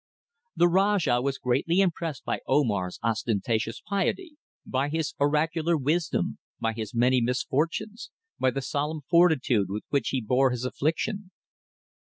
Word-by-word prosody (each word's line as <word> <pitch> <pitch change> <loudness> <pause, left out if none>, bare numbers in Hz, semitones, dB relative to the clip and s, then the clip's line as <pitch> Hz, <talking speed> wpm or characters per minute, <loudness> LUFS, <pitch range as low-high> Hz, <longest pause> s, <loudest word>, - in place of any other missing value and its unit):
The 175 - +5
Rajah 190 -8 +2
was 135 +1 -1
greatly 135 +8 +1
impressed 165 -7 -1
by - - -1
Omar's 105 -10 +1
ostentatious 115 +1 -1
piety, 295 - -1 0.3
by 135 +2 -1
his 160 0 -2
oracular 155 +3 +1
wisdom, 155 +4 -1 0.2
by 115 0 -1
his 110 0 -6
many 125 +2 +3
misfortunes, 155 - -1 0.3
by 130 - +3
the 135 +1 -3
solemn 150 +3 -2
fortitude 155 - +3
with 105 +2 -4
which 140 -4 0
he 135 - 0
bore 125 +4 +2
his 125 0 -3
affliction. 180 +9 -2
140 Hz, 135 wpm, -27 LUFS, 125-170 Hz, 0.3 s, The